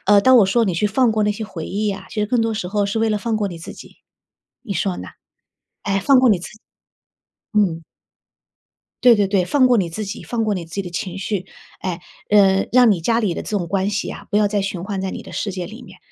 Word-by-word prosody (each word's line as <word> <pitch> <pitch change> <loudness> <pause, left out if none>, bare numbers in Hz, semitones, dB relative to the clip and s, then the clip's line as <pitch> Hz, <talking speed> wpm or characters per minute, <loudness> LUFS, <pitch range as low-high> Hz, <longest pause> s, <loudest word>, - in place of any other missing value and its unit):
呃， 205 0 +6
当 260 +3 +6
我 210 - +6
说 230 +4 +2
你 185 -5 -1
去 210 +5 +1
放 230 +2 +2
过 215 -1 +1
那 210 - +2
些 220 +1 -5
回 165 -6 -7
忆 210 +2 -2
呀， 195 -1 -5
其 210 - -3
实 210 - +1
更 240 +2 +1
多 225 - 0
时 210 -4 -3
候 205 0 0
是 205 +3 -2
为 225 0 +2
了 210 - +1
放 225 0 -1
过 210 -1 -1
你 175 - -7
自 165 - -9
己， - - -14 0.7
你 205 -6 -5
说 180 +1 -1
呢？ - - -7 0.7
哎， 195 -1 0
放 270 +4 +5
过 255 -3 +5
你 195 - +3
自 170 - -8
己， 215 - -18 1.0
嗯。 165 -5 +1 1.2
对 245 -2 +8
对 205 -2 +2
对， 195 -2 +2
放 260 +7 +3
过 250 -1 +4
你 180 -6 0
自 210 +6 -4
己， 200 - -6
放 235 -2 -2
过 210 -2 0
你 180 - -4
自 165 - -12
己 200 - -2
的 180 - -8
情 185 +2 -4
绪。 195 -1 -3 0.3
哎， 180 -2 -4 0.3
呃， 195 -2 +4
让 250 -2 +6
你 190 -5 +1
家 230 +7 +1
里 190 -6 0
的 - - -4
这 - - -8
种 175 - -4
关 195 +3 0
系 210 +1 -2
啊， - - -9
不 205 - +1
要 210 -1 +3
再 205 -1 0
循 190 -3 -4
环 195 -1 -3
在 190 0 -3
你 - - -7
的 - - -12
世 200 - -3
界 180 -2 -4
里 225 +7 -11
面， 185 -3 -14
200 Hz, 285 characters per minute, -20 LUFS, 190-220 Hz, 1.2 s, 对